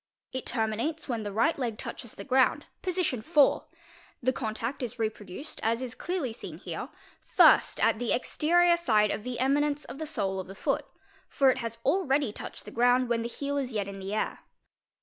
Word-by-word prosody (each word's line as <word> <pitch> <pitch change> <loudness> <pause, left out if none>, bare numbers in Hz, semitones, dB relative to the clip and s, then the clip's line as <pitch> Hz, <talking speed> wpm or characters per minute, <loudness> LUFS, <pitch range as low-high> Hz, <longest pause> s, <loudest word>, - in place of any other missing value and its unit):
It 260 - -4
terminates 230 +7 -1
when 235 -4 -2
the 205 -1 -4
right 235 +10 +2
eg 235 -4 -2
touches 235 -2 -7
the - - -7
ground, 260 -1 +3 0.2
position 360 -9 0
IV.; 290 +4 +4 0.6
the 255 +2 +2
contact 230 +2 -3
is 245 -1 -4
reproduced, 220 - -4
as 230 +1 +1
is 255 -2 -4
slearly 330 -9 -3
seen - - -8
here, - - -6 0.3
first - - +5
at - - +3
the 245 - -1
exterior 345 +7 +3
side 215 -11 +3
of 210 - -3
the 250 0 -4
eminence 285 +3 +1
of 275 - -9
the 315 - -3
sole 195 -10 -2
of 190 - -5
4 195 - -9
foot, - - -1 0.4
for 270 -2 +4
it 260 - -3
has 230 -2 -4
already 280 - +2
touched - - -8
the 210 - -8
ground 245 +2 +3
when 235 -1 +1
the 230 - -2
heel 285 +3 -3
is 255 -3 -3
yet 205 -2 -1
in 195 0 -7
the 195 +2 -4
air. - - -1
245 Hz, 195 wpm, -29 LUFS, 220-285 Hz, 0.6 s, first